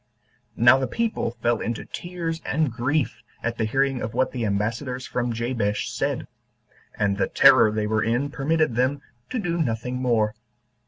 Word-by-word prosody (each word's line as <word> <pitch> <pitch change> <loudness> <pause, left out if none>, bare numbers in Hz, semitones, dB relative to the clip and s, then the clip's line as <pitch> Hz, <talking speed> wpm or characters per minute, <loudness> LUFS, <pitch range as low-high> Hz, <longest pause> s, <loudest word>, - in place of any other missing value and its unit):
Now 120 +3 +6
the 130 - -1
people 225 - -2
fell 120 -1 +2
into 115 -1 -3
tears 170 -2 -5
and 150 -2 0
grief 130 +5 -1 0.2
at 115 0 -2
the 110 - +2
hearing 135 +3 +1
of 110 +1 -4
what 130 +1 +1
the 120 -4 -2
ambassadors 115 +6 -2
from 125 -1 -2
Jabesh 115 -3 -1
said; - - -2 0.7
and 100 -1 +1
the - - +2
terror 110 - +6
they 105 0 -1
were 110 0 +1
in 120 +5 0
permitted 155 -1 +1
them 130 +4 0 0.3
to 255 - -3
do 175 -6 -1
nothing 125 -1 -2
more. 115 -4 +1
125 Hz, 165 wpm, -24 LUFS, 115-140 Hz, 0.7 s, Now